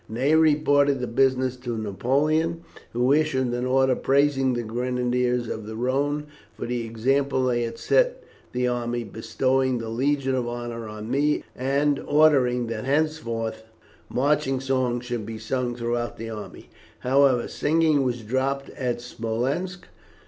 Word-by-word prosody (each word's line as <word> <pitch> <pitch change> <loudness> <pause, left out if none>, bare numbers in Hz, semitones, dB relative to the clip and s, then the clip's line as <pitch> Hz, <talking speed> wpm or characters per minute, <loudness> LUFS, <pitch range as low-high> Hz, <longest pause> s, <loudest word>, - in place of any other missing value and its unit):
Ney 130 +7 +1
reported 145 -3 +4
the 125 - -2
business 130 +1 +1
to 120 -2 -4
Napoleon, 150 - 0 0.3
who 125 +3 +2
issued 130 -5 +1
an 120 +1 -1
order 130 0 +3
praising 135 -1 +2
the 120 -1 -2
Grenadiers 125 +1 0
of 110 -1 -5
the 110 - -6
Rhone 140 +5 0 0.3
for - - -4
the 120 0 -2
example 130 +4 +1
they 120 -1 +1
had 115 -1 -3
set - - +2 0.3
the 125 0 0
army, 120 -1 -1
bestowing 125 +4 0
the 115 -1 -5
Legion 135 +3 0
of 125 -2 -1
Honour 120 -1 -5
on 105 +1 -7
me, 145 +3 +1
and 140 +2 +1
ordering 135 -5 +3
that 115 -1 -4
henceforth 135 -7 -1 0.5
marching 135 0 +1
songs 130 -2 -1
should 120 -2 -3
be 110 +1 -6
sung 120 +2 -2
throughout 120 0 -2
the 115 +1 -6
army. 105 -1 -9 0.3
However, 130 -1 +3
singing 155 -1 +2
was 125 -3 -1
dropped 135 +4 -1
at 125 -4 -3
Smolensk. 130 +11 -3
125 Hz, 145 wpm, -25 LUFS, 120-140 Hz, 0.5 s, reported